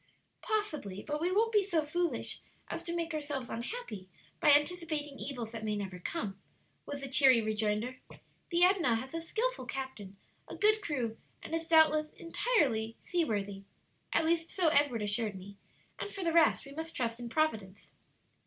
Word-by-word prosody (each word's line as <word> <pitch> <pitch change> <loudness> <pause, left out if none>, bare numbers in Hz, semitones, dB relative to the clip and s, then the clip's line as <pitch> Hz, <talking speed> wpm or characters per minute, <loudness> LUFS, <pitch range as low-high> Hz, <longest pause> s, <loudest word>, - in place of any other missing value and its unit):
"Possibly; 305 - -2
but 300 0 -3
we 350 +2 +1
won't 445 +4 +3
be 420 -2 +4
so 340 -6 0
foolish 345 +3 -1 0.3
as 335 - -3
to 340 0 -4
make 335 -1 -2
ourselves 290 -4 -3
unhappy 230 - -5 0.3
by 300 - +4
anticipating 295 -1 +1
evils 245 -5 -4
that 225 -1 -6
may 210 -1 -1
never 190 -3 -5
come," 200 - -4 0.5
was 285 -1 -5
the 275 - -4
cheery 265 -3 +7
rejoinder. 220 +3 -1 0.5
"The 345 0 +3
Edna 360 -10 +4
has 260 +5 -5
a 330 - -2
skilful 480 +9 -2
captain, 245 -8 -6 0.3
a - - -7
good 430 +1 +4
crew, 255 - -2 0.2
and - - -7
is 330 0 -2
doubtless 310 -2 +5
entirely 285 - 0
seaworthy 205 - -1 0.5
at 325 - +3
least 330 0 +1
so 355 -4 +3
Edward 285 -8 +3
assured 210 0 0
me 195 +2 -10 0.4
and 410 - -4
for 390 - -5
the 335 -1 +1
rest 330 -3 +4
we 275 - -11
must 320 +2 -5
trust 235 -2 -1
in 240 -1 -6
Providence. 220 -10 -1
290 Hz, 170 wpm, -32 LUFS, 225-335 Hz, 0.5 s, cheery